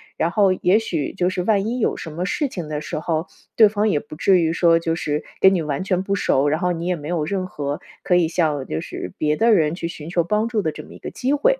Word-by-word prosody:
然 165 - 0
后 200 -1 +4
也 185 +3 +3
许 165 -10 -2
就 180 -2 +1
是 185 -1 -2
万 200 0 +2
一 245 +3 -2
有 - - +1
什 165 - -7
么 170 +4 -3
事 295 - 0
情 175 - -6
的 150 -1 -2
时 155 - -5
候， 160 +2 -2 0.3
对 220 - +8
方 210 +1 +1
也 150 - +2
不 150 +1 -11
至 185 +3 +4
于 165 -1 +1
说 170 -1 +4
就 165 0 -1
是 150 -2 -2 0.2
跟 190 0 +7
你 180 - +1
完 150 +2 -2
全 185 -1 0
不 195 +1 -1
熟 140 -7 +2
儿， - - +3
然 155 +2 0
后 180 - +1
你 170 -1 -3
也 180 - +1
没 150 -1 -7
有 165 -4 0
任 185 +2 -2
何 145 -5 -4 0.2
可 180 - +2
以 175 -2 +4
向 155 -5 0
就 80 - -3
是 90 - -7
别 150 -1 +1
的 230 +7 +3
人 160 -4 +2
去 170 -2 -4
寻 155 -1 -8
求 170 0 +1
帮 210 +6 0
助 230 -2 0
的 160 - -1
这 - - -9
么 - - -14
一 - - -11
个 - - -7
机 260 +2 -1
会。 - - +2
175 Hz, 310 characters per minute, -21 LUFS, 155-195 Hz, 0.3 s, 对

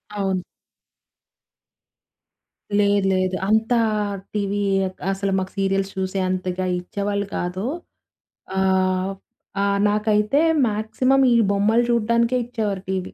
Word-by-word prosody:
అవును. 190 -3 -1 2.3
లేదు. 205 -1 +3
లేదు. 185 0 0
అంతా 220 +3 +3 0.6
టీవీ 205 -1 -1 0.3
క్ - - -36
అసలు 195 0 -2
మాకు 190 0 -4
సీరియల్స్ 195 0 0
చూసేంతగా 185 -1 -2
ఇచ్చేవాళ్ళు 200 +2 -3
కాదు. 180 +3 -3 0.9
ఆహ్, 190 0 +1 0.5
ఆహ్, 200 0 +1
నాకైతే 210 +5 +2 0.3
మాక్సిమం 220 +6 +1
ఈ - - +4 0.2
బొమ్మలు 210 +4 +3
చూడ్డానికే 235 +1 +2
ఇచ్చేవారు 210 -5 -3
టీవీ. 190 -1 -3
200 Hz, 95 wpm, -22 LUFS, 190-215 Hz, 2.3 s, ఈ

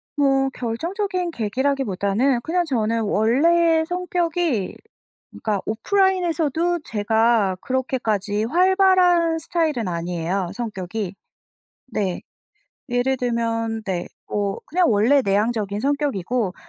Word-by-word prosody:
뭐 270 -2 +2
결정적인 350 - -2
계기라기보다는 240 - 0
그냥 345 +5 0
저는 230 -5 0
원래 320 +11 +3
성격이 345 - -1 0.6
그러니까 210 -3 -2
오프라인에서도 345 - +1
제가 220 -2 +2
그렇게까지 220 -6 -1
활발한 360 - +4
스타일은 310 - -1
아니에요 175 +2 -2
성격이. 205 -3 -4 0.7
네. 200 -6 -2 0.7
예를 245 +2 +1
들면 230 -2 -1
네 180 -3 -2 0.2
뭐 200 -1 -2
그냥 350 -2 +2
원래 230 +7 +4
내향적인 205 0 0
성격이고 255 - -1
245 Hz, 260 characters per minute, -22 LUFS, 210-330 Hz, 0.7 s, 활발한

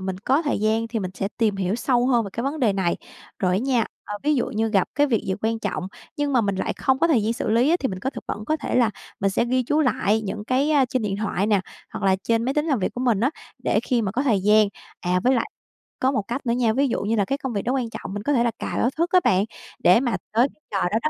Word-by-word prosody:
mình 190 -1 -4
có 270 - +1
thời 290 - 0
gian 220 +1 +1
thì 225 0 -2
mình 185 -2 -3
sẽ 195 - -2
tìm 215 -4 +2
hiểu 190 +1 -1
sâu 245 0 +1
hơn 240 -4 +3
về 200 - -6
cái 235 - -3
vấn 285 +2 -2
đề 220 -5 +3
này. 190 -3 0 0.4
Rồi 185 -2 +1
á - - +2
nha, 250 -1 +1 0.2
ơ, 205 - -5
ví 300 +1 +2
dụ 245 - +1
như 225 +1 -1
gặp 195 -4 +2
cái 290 +1 +3
việc 235 -6 +1
gì 190 - 0
quan 225 +1 0
trọng 195 -3 -3 0.3
nhưng 290 -1 -1
mà 250 - +4
mình 200 -3 0
lại - - -1
không 265 -1 +1
có 335 - +3
thời 250 -10 +3
gian 220 - +1
xử 230 - -3
lý 240 +6 +3
á, 345 - +4
thì 265 - 0
mình 185 -2 -5
có 265 - -2
thực - - -9
vẫn 210 - -4
có 310 +7 0
thể - - -4
là 240 -3 +4 0.3
mình 195 - +2
sẽ 215 - +1
ghi 255 +1 +1
chú 295 +6 +1
lại 220 -6 +1
những 210 +1 -5
cái, 260 +6 +1
a, 285 -3 +4
trên 255 -2 -1
điện 200 -2 -1
thoại 205 -2 -1
nè, 205 -3 +3 0.3
hoặc - - -6
là 190 -1 +4
trên 230 0 +1
máy 265 +2 -1
tính 300 +1 +1
làm 280 -6 +1
việc 190 - -2
của 245 - -4
mình 240 -6 +2
á, 255 +5 +2 0.3
để - - +2
khi 245 -3 0
mà 195 - -1
có 260 - 0
thời 225 -8 +2
gian 210 +1 +5 0.3
à, 180 0 +1
với 260 +1 +4
lại 235 - -1 0.5
có 260 +1 +2
một 250 - 0
cách 255 +4 -4
nữa 235 - +1
nha, 235 -3 +2
ví 275 +2 +2
dụ 235 - -1
như 215 +3 0
là 205 -3 +2
cái 275 +7 -1
công 265 -4 -4
việc 200 - -1
đó 250 - 0
quan 250 -4 -1
trọng, 195 - -7
mình 205 0 -4
có 290 - +1
thể 240 -3 +3
là 235 - +1
cài - - -3
báo 240 - +3
thức 340 +2 +1
á 365 - +6
bạn, 190 +2 +3 0.3
để 180 +6 +5
mà 245 -3 0 0.2
tới 240 +5 +4
cái 305 - -35
giờ 195 -3 +1
đó 220 - +2
đó 310 - +2
230 Hz, 315 wpm, -23 LUFS, 205-265 Hz, 0.5 s, á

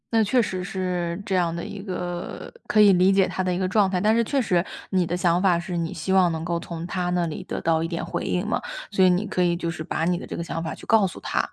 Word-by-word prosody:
那 225 - +5
确 245 +5 +3
实 185 -4 -3
是 180 -2 -3
这 190 - -1
样 170 -2 +1
的 170 - -4
一 200 - -7
个 180 -3 -5
可 210 0 +4
以 205 -1 +8
理 185 +1 +4
解 195 -1 +3
他 - - -2
的 185 -1 0
一 - - -1
个 185 - 0
状 200 0 +3
态， 185 -1 -1
但 215 +2 +4
是 230 - +3
确 275 +4 +1
实 180 -6 +2 0.3
你 185 -2 +2
的 170 - -2
想 175 0 +2
法 185 -3 +4
是 175 +1 -4
你 165 -1 -2
希 160 +4 -4
望 190 -2 +5
能 160 0 -4
够 170 0 -1
从 170 -1 -6
他 180 0 -2
那 175 -1 +1
里 155 - -6
得 - - -4
到 165 -1 +2
一 165 - -1
点 170 0 -4
回 - - -3
应 180 +2 -1
嘛。 215 - -1 0.3
所 190 -2 +4
以 - - +6
你 180 +3 +1
可 195 -3 -1
以 175 -1 +3
就 170 -1 -3
是 165 - -7
把 160 - -2
你 175 +1 +1
的 - - -8
这 - - -5
个 170 - -3
想 165 0 -4
法 165 - -4
去 - - -13
告 220 -3 +4
诉 180 - -9
他， - - -1
180 Hz, 325 characters per minute, -24 LUFS, 170-190 Hz, 0.3 s, 以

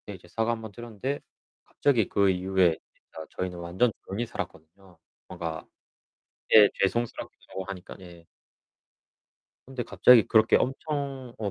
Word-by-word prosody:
그때 105 - -9
이제 90 -2 -14
사과 115 +6 -1
1 115 - -4
번 110 -2 -8
드렸는데 120 +5 -5 0.4
갑자기 120 -8 +1
그 100 -1 +2
이후에 90 -2 +2 0.2
진짜 80 - -12
저희는 90 -1 -3
완전 90 +8 0
조용히 105 +5 -3
살았거든요. 90 -2 -9 0.3
뭔가. 85 -3 -6 0.9
예 105 -2 +9
죄송스럽기도 100 -2 -3
하니까. 95 -2 -8
예. 85 -2 -14 1.4
근데 130 -1 -5
갑자기 110 +2 +5
그렇게 110 0 +5
엄청 135 -2 -3
어 105 -2 -2
100 Hz, 295 characters per minute, -27 LUFS, 90-120 Hz, 1.4 s, 예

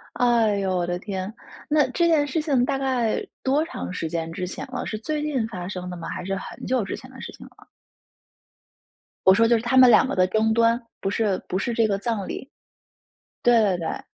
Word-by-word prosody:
哎 230 -4 +3
哟， 190 -1 -1
我 175 - -1
的 175 0 -2
天， 190 +1 -5 0.4
那 300 -1 +3
这 340 +5 +2
件 305 -3 +3
事 310 +3 -1
情 275 -6 +2
大 270 +1 -1
概 255 -5 0 0.2
多 280 +4 +2
长 325 - -6
时 170 -3 -3
间 165 0 -3
之 180 +1 -4
前 185 - -6
了， 250 - -3
是 215 - -4
最 300 +7 -3
近 275 -7 -1
发 180 -5 -6
生 180 -2 -5
的 180 - -6
吗？ 165 - -7
还 - - -5
是 195 +1 -2
很 190 - -7
久 255 -2 +1
之 - - -4
前 - - -13
的 - - -12
事 - - -7
情 - - -13
了？ - - -20 1.6
我 190 - +8
说 230 +2 +4
就 235 0 +4
是 225 - -2
她 245 +2 0
们 255 -1 +8
两 225 - +6
个 275 - -2
的 185 0 +3
争 220 +3 +1
端， 230 +1 +3 0.2
不 195 - -1
是 205 -2 0
不 185 - -1
是 240 +4 -2
这 225 -1 +3
个 200 -2 0
葬 210 -2 -2
礼。 270 - -7 0.9
对 240 -1 +5
对 195 -3 +2
对。 165 - -4
225 Hz, 245 characters per minute, -24 LUFS, 190-255 Hz, 1.6 s, 我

